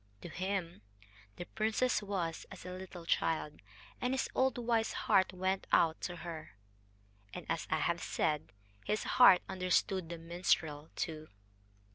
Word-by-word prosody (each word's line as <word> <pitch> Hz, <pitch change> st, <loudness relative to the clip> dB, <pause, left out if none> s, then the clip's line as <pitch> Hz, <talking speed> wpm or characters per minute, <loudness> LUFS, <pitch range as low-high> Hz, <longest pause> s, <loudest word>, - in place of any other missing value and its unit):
To -, -, -7 dB
him 185 Hz, -, -3 dB, 0.5 s
the 175 Hz, -, -6 dB
princess 220 Hz, +5 st, +1 dB
was 185 Hz, -5 st, -3 dB
as -, -, -10 dB
a 180 Hz, -, -5 dB
little 185 Hz, -2 st, -8 dB
child, 155 Hz, -2 st, 0 dB, 0.4 s
and 250 Hz, +1 st, +1 dB
his 265 Hz, -, 0 dB
old 260 Hz, -1 st, +2 dB
wise 230 Hz, -2 st, +1 dB
heart 190 Hz, -1 st, +4 dB
went 185 Hz, +1 st, -1 dB
out 160 Hz, -1 st, +4 dB
to 175 Hz, -, -3 dB
her. 155 Hz, -, -7 dB, 0.8 s
And, -, -, -6 dB
as 165 Hz, -1 st, -2 dB
I -, -, +2 dB
have 170 Hz, 0 st, 0 dB
said, 155 Hz, -1 st, -1 dB, 0.3 s
his 210 Hz, -, -1 dB
heart 245 Hz, -8 st, +7 dB
understood 185 Hz, -1 st, 0 dB
the 170 Hz, -, -5 dB
minstrel 165 Hz, -3 st, 0 dB
too. 155 Hz, -1 st, -4 dB
180 Hz, 145 wpm, -34 LUFS, 165-195 Hz, 0.8 s, heart